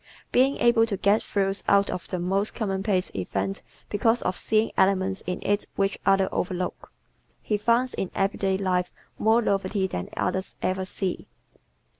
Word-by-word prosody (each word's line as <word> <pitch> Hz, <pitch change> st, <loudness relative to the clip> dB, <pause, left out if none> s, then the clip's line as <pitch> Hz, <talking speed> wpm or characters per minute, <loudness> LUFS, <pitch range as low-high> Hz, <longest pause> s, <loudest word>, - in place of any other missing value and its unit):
Being 265 Hz, +3 st, +3 dB
able 235 Hz, -1 st, +4 dB
to 200 Hz, -3 st, -2 dB
get 200 Hz, +3 st, +3 dB
thrills 195 Hz, -1 st, -1 dB
out 200 Hz, 0 st, +4 dB
of 180 Hz, -, -5 dB
the 185 Hz, -, -3 dB
most 195 Hz, +4 st, 0 dB
commonplace 195 Hz, -2 st, -1 dB
event 95 Hz, +1 st, -3 dB, 0.3 s
because 225 Hz, +3 st, +1 dB
of 185 Hz, -, 0 dB
seeing 220 Hz, +1 st, +1 dB
elements 190 Hz, 0 st, +2 dB
in 180 Hz, -, -1 dB
it 205 Hz, 0 st, 0 dB
which 195 Hz, 0 st, 0 dB
others 195 Hz, -1 st, +4 dB
overlook, 180 Hz, 0 st, -3 dB, 0.5 s
he 210 Hz, -, -1 dB
finds 235 Hz, +4 st, +2 dB
in 190 Hz, -, -3 dB
everyday 195 Hz, -1 st, +1 dB
life 180 Hz, -2 st, 0 dB, 0.3 s
more 225 Hz, +2 st, +4 dB
novelty 195 Hz, -1 st, 0 dB
than 90 Hz, -, -4 dB
others 190 Hz, 0 st, -2 dB
ever 185 Hz, 0 st, -1 dB
see. 185 Hz, 0 st, -4 dB
195 Hz, 155 wpm, -26 LUFS, 185-210 Hz, 0.5 s, able